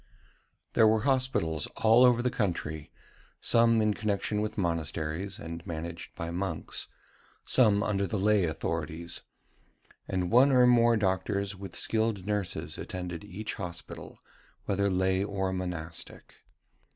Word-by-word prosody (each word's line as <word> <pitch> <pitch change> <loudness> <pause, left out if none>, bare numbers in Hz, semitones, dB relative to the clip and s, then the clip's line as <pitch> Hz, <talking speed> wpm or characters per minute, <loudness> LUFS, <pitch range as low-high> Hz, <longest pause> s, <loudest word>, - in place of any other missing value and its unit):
There 110 - +6
were 110 0 +3
Hospitals 130 - +1
all 115 +3 +6
over 120 -1 +5
the 125 - +1
country, 80 -8 -2 0.5
some 115 -1 +4
in 105 -1 +2
connexion 105 0 -1
with 110 +1 -3
monasteries, 85 +1 -2
and 85 +1 -7
managed 85 +1 -6
by 85 0 -4
monks, 90 -2 -3 0.6
some 105 -5 +4
under 100 -2 0
the 105 - -2
lay 100 -1 +3
authorities; 80 +1 -3 0.9
and 90 -2 -1
one 130 +4 +6
or 125 -2 +6
more 120 -1 +5
doctors 100 0 0
with 95 0 -9
skilled 110 -4 0
nurses 105 -4 -3
attended 90 -2 -5
each 105 +2 -5
hospital, 90 -2 -7 0.5
whether 100 0 +1
lay 95 0 +1
or 95 -2 -2
monastic. 90 -3 -6
100 Hz, 125 wpm, -29 LUFS, 85-110 Hz, 0.9 s, There